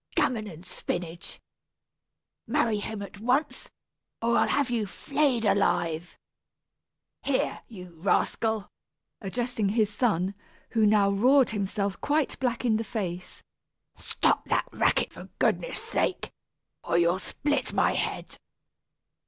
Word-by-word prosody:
Gammon 220 -4 +1
and 170 -2 -10
spinach! 175 -1 -4 1.1
Marry 215 -3 +1
him 205 0 -5
at 200 0 -10
once, 255 +7 0 0.5
or 235 +1 +1
I'll - - +4
have 280 -3 +1
you 225 -4 0
flayed 270 +1 0
alive! 175 -4 +1 1.0
Here, 275 -2 0
you 180 -6 -10
rascal 220 +2 +1 0.5
(addressing 225 0 -1
his 215 -1 +1
son, 200 -5 +1 0.4
who 230 - 0
had 215 -1 +6
now 205 -2 +4
roared 255 +6 +4
himself 200 -1 -2
quite 295 -1 0
black 250 -1 -1
in 220 -3 +3
the 225 - -2
face), 185 -6 -5 0.5
stop - - 0
that - - +1
racket, - - +1
for - - -9
goodness' - - +1
sake, - - -1 0.5
or 170 - +1
you'll 175 +2 +3
split 290 +9 -1
my - - +3
head." - - -3
215 Hz, 125 wpm, -27 LUFS, 195-245 Hz, 1.1 s, had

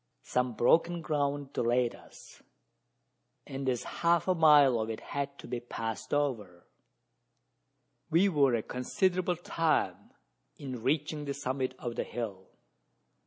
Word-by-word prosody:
Some 125 -1 0
broken 165 +8 +3
ground 145 -2 -1
delayed 120 0 +1
us; - - -15 1.0
and 135 0 -3
as 125 -2 -1 0.2
half 170 0 +3
a 185 - +4
mile 150 -7 +6
of 110 0 -2
it 110 - -4
had 140 0 -4
to - - -11
be 120 0 -3
passed 115 -2 -5
over, 115 -12 -2 1.4
we 170 +5 +4
were 140 -8 +3
a 110 - -1
considerable 180 +8 0
time 165 -1 -1 0.5
in 130 -5 -6
reaching 150 +3 -1
the 140 -1 -3
summit 130 -1 -2
of 120 -2 -5
the - - 0
hill. 100 -6 -6
135 Hz, 130 wpm, -30 LUFS, 120-155 Hz, 1.4 s, mile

